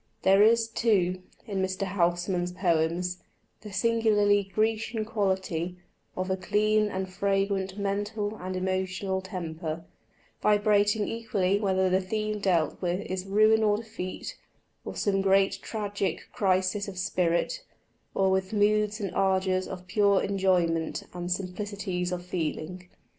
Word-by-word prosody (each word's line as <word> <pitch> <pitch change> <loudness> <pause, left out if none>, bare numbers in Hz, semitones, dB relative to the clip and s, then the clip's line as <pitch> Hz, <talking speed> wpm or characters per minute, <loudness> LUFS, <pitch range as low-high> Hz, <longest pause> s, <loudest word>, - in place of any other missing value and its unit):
There 195 +1 +6
is, 225 +1 +5
too, 195 -6 +1 0.2
in 200 -4 -2
Mr. 190 +1 -1
Housman's 175 -1 0
poems, 175 0 0 0.4
the 210 -1 -9
singularly 205 -1 +3
Grecian 220 +1 0
Quality 190 -5 -1 0.4
of 185 +1 -1
a - - +2
clean 210 +2 +2
and 190 -1 -3
fragrant 195 0 -1
mental 205 +1 -2
and 185 0 -5
emotional 190 +1 -1
temper, 165 -3 -5 0.6
vibrating 205 0 +3
equally 200 -4 0
whether 190 -2 +2
the 185 +1 +2
theme 215 +2 -2
dealt 175 -6 +1
with 180 +1 -1
is 185 -1 -4
ruin 215 +2 +4
or 210 -1 +3
defeat, 220 -4 -6 0.4
or - - -6
some 195 -2 +1
great 195 0 +3
tragic 205 -5 -3
crisis 190 +1 +1
of 195 -2 -7
spirit, 185 - 0 0.5
or 190 -1 +3
with 190 +1 0
moods 210 0 +2
and 200 -4 -3
ardours 190 -1 +1
of 180 -1 -7
pure 200 0 +3
enjoyment 180 -4 +1
and 175 0 -4
simplicities 185 -1 -3
of 175 0 -4
feeling. 180 +1 -4
190 Hz, 130 wpm, -28 LUFS, 185-205 Hz, 0.6 s, There